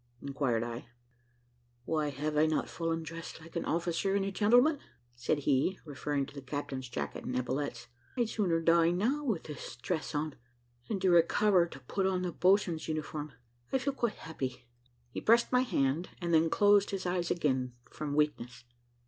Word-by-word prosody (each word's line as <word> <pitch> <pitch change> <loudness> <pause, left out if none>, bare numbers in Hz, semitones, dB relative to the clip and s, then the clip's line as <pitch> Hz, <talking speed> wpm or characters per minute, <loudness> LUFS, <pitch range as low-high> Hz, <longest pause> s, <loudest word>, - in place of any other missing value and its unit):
inquired 135 -5 -1
I. 120 0 -6 1.0
"Why, 155 -2 0
have 150 +2 -3
I 155 +1 +4
not 155 - 0
fallen 165 -1 -2
dressed 165 +1 -7
like 160 +2 -14
an 170 - -1
officer 170 +3 0
and 200 -1 +1
a 195 - -2
gentleman?" 245 +9 +4 0.3
said 125 +5 -1
he, 145 +7 +2
referring 145 -1 -2
to - - -13
the 140 - -7
captain's 135 -1 -5
jacket 120 - -4
and 125 - -2
epaulets. 130 0 -2 0.3
"I'd 240 -2 +2
sooner 185 -7 +1
die 165 0 +5
now, 230 +12 0
with 225 - -1
this 150 -3 -8
dress 155 +5 -3
on, 150 0 -1 0.6
than 205 - -1
to 185 - +4
recover 175 +2 +4
to 150 - -11
put 190 +10 -1
on 185 -1 0
the 180 - -1
boatswain's 180 -2 +2
uniform. 155 -2 -4 0.4
I - - +3
feel 270 +2 -1
quite 235 -4 -1
happy." 130 -6 -6 0.4
He - - -5
pressed 235 +2 +4
my 250 0 +4
hand, 155 - 0
and 170 -2 -1
then 160 0 +5
closed 205 +1 +4
his 195 -2 -3
eyes 180 -1 0
again, 130 -7 0 0.2
from 145 -2 -4
weakness. 140 -5 -1
165 Hz, 175 wpm, -31 LUFS, 140-190 Hz, 1.0 s, die